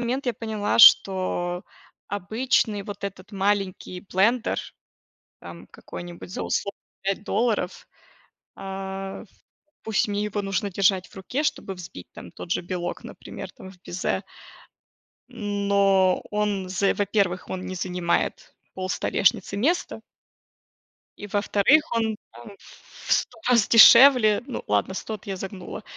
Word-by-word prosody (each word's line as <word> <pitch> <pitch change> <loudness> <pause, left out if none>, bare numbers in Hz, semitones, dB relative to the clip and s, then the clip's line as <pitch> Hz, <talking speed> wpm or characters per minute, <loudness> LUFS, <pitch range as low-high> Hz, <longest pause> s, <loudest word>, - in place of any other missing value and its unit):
момент 255 +3 -2
я 245 - 0
поняла, 215 -2 -2
что 185 -4 +5 0.4
обычный 215 +2 0
вот 200 0 -8
этот 195 +1 -8
маленький 195 -2 -2
блендер, 230 +6 +2 0.8
там, - - -11
какой-нибудь 175 0 -10
за - - -4
условные 200 0 -3 0.2
5 195 +1 -2
долларов, 215 -4 -1 0.7
а, 195 0 -6
ф - - -17 0.5
пусть 220 -1 0
мне 205 0 -2
его 210 -1 -3
нужно 195 +1 -2
держать 190 -1 +1
в - - -20
руке, 200 +9 -3
чтобы 200 -9 -2
взбить 165 - -10
там 85 - -11
тот 170 - -9
же - - +1
белок, 175 0 -5
например, - - -9
там, 190 - -12
в 180 - -21
безе. 185 -1 -3 1.1
Но 200 -2 +1
он 210 -3 -1
з 195 +2 +1
во-первых, 200 -3 0
он 185 0 -5
не 185 - -5
занимает 180 -1 -2 0.2
пол 185 0 -4
столешницы 195 +1 0
места 300 - 0 1.2
И 205 - -7
во-вторых, 205 +8 +3
он, 225 -2 0
там, 120 - -13
ф 200 - -18 0.2
в - - 0
100 - - 0
раз 235 -4 +4
дешевле, 235 -2 +8
ну 260 - -5
ладно, 105 - 0
100 220 - -5
эт 210 - -10
я 195 -1 -4
загнула, 190 0 -7
200 Hz, 135 wpm, -24 LUFS, 185-215 Hz, 1.2 s, дешевле